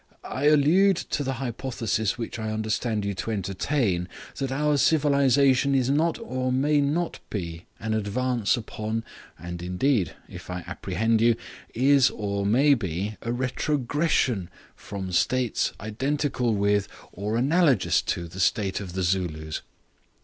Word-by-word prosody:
I 135 - -3
allude 160 +6 +5
to 145 - -2
the 135 -1 -1
hypothesis 115 -4 -2
which 120 0 -5
I 110 0 -3
understand 110 0 -1
you 100 - -1
to 95 +4 -5
entertain, 100 - -1 0.3
that 135 -1 -2
our 150 +2 +1
civilization 140 -2 +3
is 130 0 +2
not 160 +4 +2
or 130 - -2
may 145 +3 +2
not 160 +5 -1
be 85 -4 -5
an 110 +1 -2
advance 115 +2 0
upon, 110 0 -4 0.3
and 85 +1 -7
indeed 90 - 0
(if - - -11
I 90 -1 -4
apprehend 100 +6 0
you), 115 0 +5 0.4
is 135 +2 +5
or 100 -1 -2
may 135 +7 +5
be 100 - -2
a 115 - -3
retrogression 130 - 0 0.3
from 95 -2 -6
states 125 +6 +1
identical 125 +2 -1
with 100 0 +2 0.2
or 105 +4 -2
analogous 145 +2 +3
to 85 -1 -3
the 90 +3 -10
state 95 +1 +1
of 95 -4 -7
the 95 0 -1
Zulus. 85 -4 -1
115 Hz, 140 wpm, -26 LUFS, 100-140 Hz, 0.4 s, allude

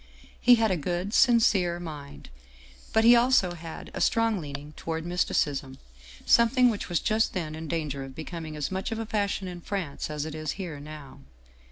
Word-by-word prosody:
He 245 - +7
had 225 -3 +2
a 185 - +1
good, 175 +6 -3
sincere 205 -9 +4
mind, 145 - -9 0.6
but 220 - +3
he 235 - +8
had 240 - +7
also 245 -7 +3
a 165 -2 -8
strong 225 -3 +2
leaning 145 0 -7
toward 160 +1 -4
mysticism, 145 -6 -1 0.5
something 240 +1 +5
which 205 -2 -5
was 175 -3 +1
just 220 +1 +1
then 165 -5 -3
in 160 +1 -6
danger 150 -4 -3
of 135 -1 -10
becoming 160 0 -6
as 150 +2 -3
much 190 +3 -3
of 225 - -2
a 225 - -3
fashion 200 -3 -1
in 175 -1 -7
France 175 -8 -4
as 150 -1 -3
it 160 - -6
is 155 -1 -3
here 170 -7 -6
now. 145 -2 -10
175 Hz, 185 wpm, -27 LUFS, 150-210 Hz, 0.6 s, he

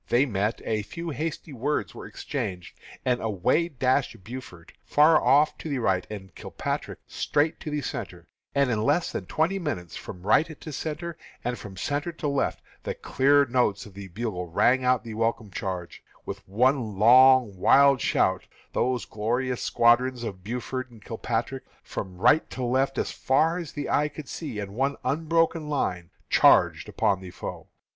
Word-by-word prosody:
They 125 +4 +4
met; 105 -3 -1
a 110 -1 0
few 165 +11 -6
hasty 155 +1 -4
words 135 +4 -2
were - - -9
exchanged, 90 -2 -5 0.3
and 125 -1 +1
away 110 - +1
dashed 130 - 0
Buford 100 -7 -10
far 155 +1 +5
off 150 +2 +4
to 160 - -6
the 140 - -1
right, 95 -6 0
and 95 -4 -8
Kilpatrick - - -4
straight 150 +2 0
to - - -6
the 150 0 -2
centre; - - -6 0.3
and 140 -2 +3
in 110 -2 0
less 150 +9 +1
than - - -5
twenty 175 +5 0
minutes, 90 - -4
from 90 - -9
right 155 +9 +2
to 155 - -8
centre, 160 +3 -5 0.2
and 125 +1 -1
from 95 -2 -10
centre 145 - -2
to 160 - -4
left, 140 -1 -1 0.2
the - - -4
clear 140 +2 +3
notes 120 -5 +1
of 105 - -13
the 100 0 -8
bugles 95 -2 -4
rang 130 +1 +4
out 125 -1 +2
the 115 - -7
welcome 115 -1 -1
charging, 95 -3 -5 0.2
and - - -34
with - - -7
one 120 -1 +1
long, 125 0 +6
wild 140 +8 +5
shout, 95 0 +1 0.3
those 125 0 0
glorious 120 +4 -2
squadrons 120 +1 +3
of 95 -5 -6
Buford 125 +4 -4
and 115 -4 -17
Kilpatrick, 120 +3 -3 0.2
from 90 -1 -6
right 150 - +4
to 130 - -5
left, 130 +2 +1
as - - -1
far 160 +6 +1
as 170 -4 -7
the 145 -1 -4
eye 150 - +2
could 150 -1 -9
see, 150 -7 -6
in 100 -1 -5
one 135 +5 0
unbroken 165 +1 +1
line, 90 - -1 0.2
charged - - +4
upon 95 -2 +1
the 95 - -8
foe. - - -7
125 Hz, 175 wpm, -26 LUFS, 105-145 Hz, 0.3 s, long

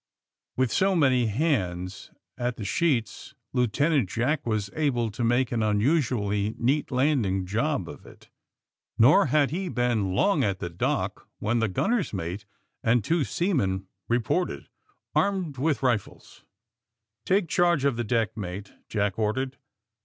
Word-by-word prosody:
With 130 -3 +1
so 195 0 +2
many 130 -7 +3
hands 95 - -1 0.3
at 125 0 -2
the 105 - -5
sheets 120 - -1 0.2
Lieutenant 130 - +2
Jack 130 +6 -1
was 105 -3 -1
able 125 -7 0
to 115 +4 -4
make 120 +2 +2
an 120 -2 0
unusually 105 -2 +1
neat 140 +5 +1
landing 125 -9 +1
job 110 - -1
of 75 - -10
it. - - -16 0.7
Nor 125 +6 +6
had 145 +1 +2
he 185 +3 -2
been 115 - 0
long 180 - +3
at 100 -2 0
the 90 -1 -5
dock 85 - -2
when 115 +3 0
the 115 - +2
gunner's 195 - 0
mate 95 +3 -4 0.4
and 115 0 +2
two 165 - +1
seamen 125 - 0 0.2
reported, 120 +10 -1 0.4
armed 185 -9 0
with 145 0 0
rifles. 120 -6 -2 0.8
Take 195 -1 +2
charge 170 -4 +2
of 140 -3 +2
the 120 - -2
deck, 115 -1 0
mate," 100 -1 -6 0.2
Jack 100 -1 -1
or 110 -1 +1
dered. 130 0 -2
120 Hz, 145 wpm, -26 LUFS, 105-150 Hz, 0.8 s, Nor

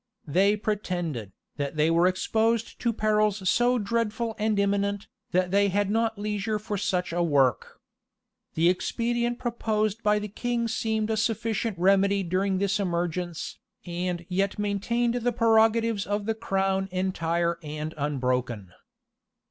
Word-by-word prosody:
They 190 +7 +3
pretended, 175 - -3 0.3
that 145 +1 -3
they 155 +2 +3
were 170 +2 +4
exposed 220 +4 0
to 235 - +1
perils 215 -2 +1
so 245 +5 +3
dreadful 225 +1 -1
and 215 0 +1
imminent, 200 0 0 0.2
that 180 0 +1
they 200 +1 +4
had 200 +1 0
not 225 0 +1
leisure 210 +1 -2
for 210 0 -4
such 180 -3 -1
a 175 - +1
work.[] 140 -6 +1 0.8
The 165 +2 +3
expedient 235 +6 0
proposed 220 -3 -1
by 210 -1 +3
the 210 0 -3
king 235 +3 -2
seemed 220 -1 -1
a 220 - 0
sufficient 220 -1 -1
remedy 195 +2 +3
during 190 +2 0
this 200 +2 0
emergence, 175 -2 -2 0.3
and 175 0 -3
yet 195 +1 0
maintained 210 +4 0
the 245 0 0
prerogatives 225 -2 +3
of 205 0 -1
the 225 - 0
crown 195 -3 -1
entire 170 -2 0
and 155 0 -5
unbroken. 125 - -2
200 Hz, 140 wpm, -26 LUFS, 175-220 Hz, 0.8 s, were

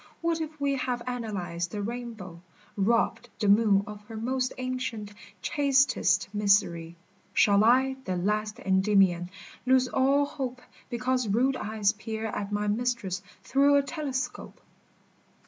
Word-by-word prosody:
what 330 -1 0
if 310 -1 -6
we 280 -1 +1
Have 250 -2 -2
analyzed 200 -8 -3
the 205 - -5
rainbow, 220 -7 -6 0.3
robbed 230 +3 +1
the 210 - -1
moon 200 -1 +5
Of 210 0 -9
her 220 +1 -8
most 255 +3 -1
ancient, 255 -5 -4 0.3
chastest 275 -2 +2
mystery, 195 -5 +2 0.4
Shall 205 0 +5
I, 260 +3 +4
the 185 -1 -2
last 210 +3 -1
Endymion, 190 -2 +2 0.3
lose 255 0 +3
all 275 +3 +2
hope 260 -4 -5 0.3
Because 250 0 0
rude 250 +6 +2
eyes 210 -3 0
peer 220 +1 -5
at 205 -2 -4
my 205 0 -1
mistress 210 -4 -1 0.2
through 280 +4 +4
a 280 - +4
telescope 270 -4 -4
230 Hz, 130 wpm, -28 LUFS, 205-260 Hz, 0.4 s, moon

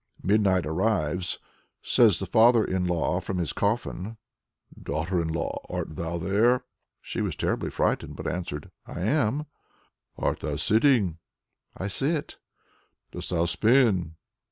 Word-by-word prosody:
Midnight 95 -3 +3
arrives. 90 0 0 0.5
Says 110 -7 +5
the 95 - -3
father 115 +1 +5
in 95 -1 -1
law 90 0 0
from 95 0 -4
his 85 -3 -2
coffin: 105 0 -2 0.6
"Daughter 90 +1 -1
in 85 - -2
law, 80 +1 -3
art 80 - -4
thou 85 +2 -3
there?" 110 +8 +2 0.4
She - - -4
was - - -2
terribly - - -1
frightened, - - -1
but - - -8
answered, 85 -5 -4 0.2
"I - - -6
am." 140 +5 +1 0.7
"Art - - -1
thou 75 - -3
sitting?" 105 - +3 0.6
"I 95 - -3
sit." 140 +9 -1 0.7
"Dost - - -6
thou 85 -1 +1
spin?" 95 - +3
95 Hz, 130 wpm, -26 LUFS, 85-115 Hz, 0.7 s, Says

